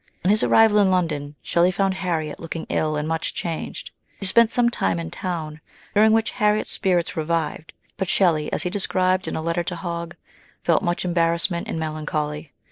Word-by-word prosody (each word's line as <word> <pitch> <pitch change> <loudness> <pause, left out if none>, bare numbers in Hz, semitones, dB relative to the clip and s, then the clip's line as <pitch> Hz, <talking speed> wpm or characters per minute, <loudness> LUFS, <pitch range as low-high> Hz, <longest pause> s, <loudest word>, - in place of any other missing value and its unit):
On 190 - +5
his 215 - +3
arrival 220 -2 +5
in 200 -2 +4
London, 155 -6 -1
Shelley 170 +1 +3
found 195 +1 +1
Harriet 170 -5 -3
looking 165 0 -5
ill 155 -1 0
and 150 0 -2
much 160 0 -2
changed. 165 -2 -5 0.3
He 195 - -5
spent 230 +4 +4
some 240 -1 +2
time 95 - 0
in 80 -1 -5
town, 160 -4 -4 0.3
during 215 +1 +5
which 225 0 +2
Harriet's 210 0 +1
spirits 180 -3 0
revived; 160 0 -2 0.3
but 190 -3 -2
Shelley, 165 -6 +2
as - - 0
he 180 - -2
described 185 -2 +1
in - - -3
a 160 - -3
letter 170 +1 0
to 180 - -3
Hogg, 170 -1 -5 0.5
felt 170 - +3
much 175 +1 -1
embarrassment 170 0 +1
and - - -3
melancholy. 155 -1 -3
170 Hz, 185 wpm, -23 LUFS, 155-190 Hz, 0.5 s, On